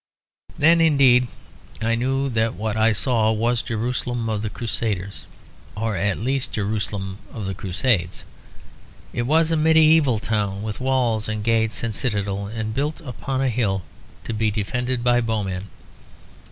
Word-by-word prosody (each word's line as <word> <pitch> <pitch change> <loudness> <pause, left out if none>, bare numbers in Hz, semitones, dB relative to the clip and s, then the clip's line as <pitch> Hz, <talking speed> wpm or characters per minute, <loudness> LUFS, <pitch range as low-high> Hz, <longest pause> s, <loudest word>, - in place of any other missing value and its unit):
Then 165 +3 +5
indeed 135 -6 +5 0.5
I 115 +1 +1
knew 135 +4 0
that 115 -3 0
what 110 +3 -2
I 110 +1 +4
saw 110 +1 +2
was 115 +2 +1
Jerusalem 120 0 -2
of 105 -2 -1
the 110 - -2
Crusaders; 105 -4 -3 0.5
or 110 -1 -1
at 100 +2 0
least 130 +4 -2
Jerusalem 100 -2 -3
of 110 -4 -6
the 95 - -2
Crusades. 95 -1 0 0.9
It 120 0 -1
was 160 +2 +3
a - - +3
medieval 155 -4 +5
town, 105 -2 -2
with 110 -1 -4
walls 125 -5 +1
and 110 -1 -3
gates 115 0 +1
and 115 -1 -1
a - - -2
citadel, 100 -4 -1
and 110 0 -4
built 145 +5 -2
upon 135 -1 -4
a 135 - +2
hill 105 -6 0 0.4
to - - -4
be 110 0 +1
defended 125 +4 -2
by 120 0 +3
bowmen. 100 -4 -2
115 Hz, 155 wpm, -22 LUFS, 105-125 Hz, 0.9 s, Then